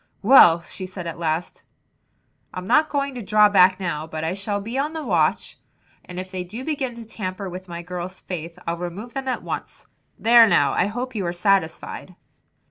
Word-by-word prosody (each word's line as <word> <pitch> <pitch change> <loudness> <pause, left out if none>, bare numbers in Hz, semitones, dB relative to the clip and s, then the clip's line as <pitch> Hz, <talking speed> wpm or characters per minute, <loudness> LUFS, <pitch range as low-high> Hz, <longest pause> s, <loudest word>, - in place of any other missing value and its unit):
"Well," 185 -8 +7
she 185 +2 -8
said 185 -1 -8
at 165 0 -6
last, 165 +1 -2 0.9
"I'm 185 0 -5
not 310 +8 +3
going 280 -1 -1
to 245 - -6
draw 210 +1 +4
back 185 -2 +5
now, 160 -4 -3
but 160 0 -5
I 160 +2 -1
shall 200 +1 -3
be 225 +5 -6
on 290 +4 -1
the 320 -1 -5
watch 170 - 0 0.4
and 180 0 -8
if 185 0 -7
they 185 -1 -4
do 220 +8 -8
begin 270 -6 -2
to 230 -1 -9
tamper 195 -3 -5
with 185 +1 -8
my 170 0 -7
girls' 180 +1 -6
faith 170 -2 -7
I'll 170 0 -2
remove 180 +7 -6
them 270 -1 -4
at 255 - -2
once. - - -6 0.3
There 230 0 +7
now - - +3
I - - +2
hope 245 +5 -4
you 210 -4 -2
are 170 - -2
satisfied!" 185 -1 -1
190 Hz, 200 wpm, -23 LUFS, 175-230 Hz, 0.9 s, Well